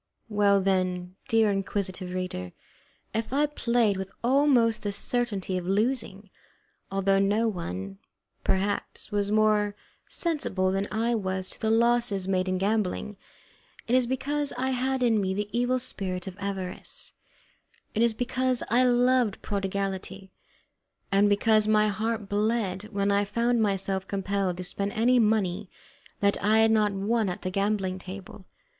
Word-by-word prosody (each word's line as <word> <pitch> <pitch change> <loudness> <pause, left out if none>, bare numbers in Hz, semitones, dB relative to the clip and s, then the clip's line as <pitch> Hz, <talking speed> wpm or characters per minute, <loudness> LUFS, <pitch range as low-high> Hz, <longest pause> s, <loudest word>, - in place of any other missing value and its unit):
Well, 200 -2 +3
then, 185 -1 -1
dear 225 -2 +3
inquisitive 195 -2 -2
reader, 180 - -4 0.6
if 225 +2 -2
I 285 +3 +3
played 235 -8 +1
with 190 0 -4
almost 250 -3 +3
the 205 - -2
certainty 200 -4 -1
of 175 - -8
losing, 205 -1 -1 0.6
although 195 0 +2
no 205 +4 +2
one, 95 - -5 0.4
perhaps, 200 +3 -2
was 205 0 0
more 210 -1 +2 0.3
sensible 200 - 0
than 195 +1 -1
I 230 +2 0
was 190 -3 -2
to - - -8
the 220 - +1
losses 230 -4 +3
made 185 -1 +1
in 185 - 0
gambling, 210 +1 -1 0.7
it 235 - -1
is 255 -1 +4
because 285 +3 -1
I 260 +2 -1
had 260 0 0
in 225 -3 +3
me 190 -1 -1
the 205 +1 -2
evil 245 +1 +2
spirit 190 -8 -4
of 190 -2 -7
avarice; 195 -2 -5 0.8
it 220 - 0
is 235 -1 +3
because 255 +1 0
I 245 +3 +4
loved 245 -3 +2
prodigality, 195 -1 -3 0.8
and 200 +1 +4
because 215 +1 +3
my 215 0 +4
heart 220 0 -2
bled 205 -2 -1
when 200 -2 -1
I 200 0 +3
found 235 +3 +1
myself 195 -2 -1
compelled 195 -2 -1
to 185 - -4
spend 200 +2 -3
any 245 +3 +3
money 210 -3 +1 0.5
that 200 0 +2
I 215 +2 +4
had 220 0 +5
not 215 -2 +3
won 205 +2 0
at 180 - -5
the 185 - -2
gaming 195 -1 -1
table. 190 +1 -10
205 Hz, 150 wpm, -27 LUFS, 190-230 Hz, 0.8 s, had